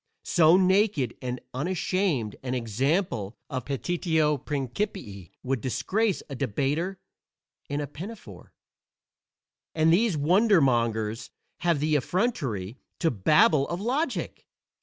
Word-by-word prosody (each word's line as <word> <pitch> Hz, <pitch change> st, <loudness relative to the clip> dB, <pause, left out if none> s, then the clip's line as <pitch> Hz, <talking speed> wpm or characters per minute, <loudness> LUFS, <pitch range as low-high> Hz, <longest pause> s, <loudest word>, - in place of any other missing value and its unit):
So 165 Hz, 0 st, +5 dB
naked 185 Hz, -, +2 dB
and 125 Hz, 0 st, -3 dB
unashamed 165 Hz, -, -1 dB
an 130 Hz, -1 st, -3 dB
example 120 Hz, -, -1 dB
of 130 Hz, -2 st, -3 dB
petitio 155 Hz, +1 st, 0 dB
principii 130 Hz, -, -4 dB
would 130 Hz, -2 st, -1 dB
disgrace 200 Hz, -, 0 dB
a 140 Hz, -, -7 dB
debater 145 Hz, -, -1 dB, 0.7 s
in 145 Hz, +1 st, -1 dB
a -, -, -2 dB
pinafore. 150 Hz, -, -10 dB, 1.2 s
And 160 Hz, 0 st, +4 dB
these 200 Hz, -2 st, +2 dB
wonder 190 Hz, +7 st, +4 dB
mongers 115 Hz, -5 st, 0 dB, 0.3 s
have 170 Hz, -4 st, +1 dB
the 155 Hz, +1 st, +1 dB
effrontery 135 Hz, -, -1 dB, 0.2 s
to 165 Hz, -, +1 dB
babble 150 Hz, -, +4 dB
of 170 Hz, -, -3 dB
"logic"! 260 Hz, +10 st, -2 dB
150 Hz, 110 wpm, -27 LUFS, 125-185 Hz, 1.2 s, So